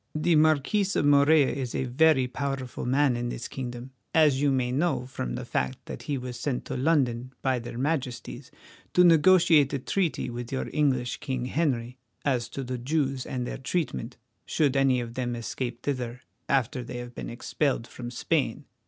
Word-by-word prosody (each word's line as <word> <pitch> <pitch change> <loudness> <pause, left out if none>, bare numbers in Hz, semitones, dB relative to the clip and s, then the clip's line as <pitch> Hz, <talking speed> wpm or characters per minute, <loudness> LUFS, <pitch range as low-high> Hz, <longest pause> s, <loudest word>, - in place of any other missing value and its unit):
The 160 +2 +2
Marquis 155 +6 +3
of - - +2
Morella 145 0 +5
is 130 -3 -4
a - - 0
very 130 +1 +4
powerful 130 -1 -4
man 135 0 +3
in 120 0 -2
this 120 - -5
kingdom, 125 0 -6 0.2
as 150 -4 +5
you 145 - +3
may 130 -2 +1
know 145 -1 0
from 65 - -4
the - - -5
fact 65 0 -1
that - - -7
he 145 - -2
was 125 -1 -6
sent 135 -4 -2
to - - -4
London 130 -3 +1
by 130 -2 +1
their 115 0 -7
Majesties 130 -3 -3 0.5
to 180 - +7
negotiate 165 -3 +6
a - - +1
treaty 170 +6 -1
with 120 0 -6
your 135 - -2
English 130 -5 +1
King 130 -2 -3
Henry 130 -4 -1 0.3
as 125 -4 0
to 135 - -5
the 125 0 -4
Jews 135 0 -1
and 125 -1 -3
their - - -5
treatment, 135 -4 -3 0.3
should 145 -4 +1
any 135 -2 +3
of 115 -1 -6
them 120 -1 -2
escape 120 +1 -4
thither 125 -3 -3 0.3
after 130 -1 +1
they 120 - -7
have 120 0 -7
been - - -6
expelled 130 +1 -1
from 120 0 -8
Spain. 120 - -1
130 Hz, 180 wpm, -27 LUFS, 120-145 Hz, 0.5 s, to